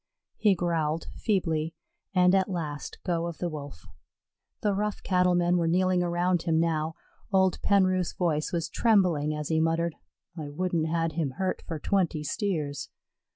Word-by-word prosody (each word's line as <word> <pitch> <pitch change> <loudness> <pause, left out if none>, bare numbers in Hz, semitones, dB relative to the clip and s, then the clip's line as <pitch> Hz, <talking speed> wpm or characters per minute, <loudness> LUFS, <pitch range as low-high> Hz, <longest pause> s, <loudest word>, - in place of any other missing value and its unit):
He 205 -3 +4
growled 165 -3 -1
feebly, 165 -6 0 0.4
and 180 -1 +4
at 190 0 +3
last 155 -5 -4
go 170 -2 0
of 170 - -6
the 175 - -2
Wolf. 145 - -8 0.8
The 205 -2 +2
rough 210 +1 -2
cattle 180 -1 +3
men 175 0 +3
were 170 -1 +1
kneeling 185 +1 +2
around 175 0 +1
him 160 -2 +1
now; 160 -1 0 0.4
old 190 -2 +3
Penroof's 185 -3 +2
voice 155 -4 0
was 170 -2 -1
trembling 180 -10 +2
as 150 -1 -4
he 160 -1 +2
muttered, 165 +1 +1 0.4
"I 155 -4 -5
wouldn't 165 +1 -1
had 165 0 0
him 150 -4 -2
hurt 190 -1 -1
for 165 - -3
twenty 170 -2 0
steers." 150 -6 -2
170 Hz, 155 wpm, -28 LUFS, 160-185 Hz, 0.8 s, He